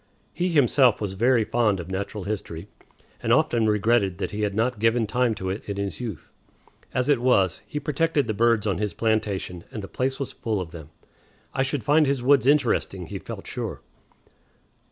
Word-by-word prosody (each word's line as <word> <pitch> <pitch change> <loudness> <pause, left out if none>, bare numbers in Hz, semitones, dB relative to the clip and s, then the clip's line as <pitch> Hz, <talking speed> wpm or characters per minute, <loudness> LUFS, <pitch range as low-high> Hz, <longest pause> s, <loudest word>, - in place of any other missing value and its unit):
He 180 - -1
himself 135 -6 +4
was 100 -3 -3
very 120 +3 +3
fond 110 -3 +1
of 90 +2 -7
natural 100 +1 -4
history, 95 -3 -5 0.5
and - - -1
often 115 -2 +3
regretted 105 -3 +2
that - - -3
he 105 - -4
had 100 -1 -1
not 115 +1 0
given 115 +1 +2
time 120 +1 +1
to 95 -2 -3
it 100 - -5
in 100 - -3
his 100 -1 -3
youth. 110 -10 -7 0.6
As 125 +1 0
it 145 -5 +3
was, 100 -8 +2
he 150 - -4
protected 155 0 0
the 110 - -2
birds 115 0 +2
on 95 -4 0
his 105 -1 -2
plantation, 100 -6 -1
and 105 - -6
the - - -6
place 130 +7 -2
was 140 - -3
full 110 -3 -2
of 85 -3 -5
them. 80 -3 -10 0.6
I - - 0
should 135 -1 -1
find 150 +4 +4
his 135 -3 0
woods 135 0 +4
interesting, 125 -10 +2
he - - -6
felt - - -8
sure. - - -5
110 Hz, 195 wpm, -25 LUFS, 100-125 Hz, 0.6 s, himself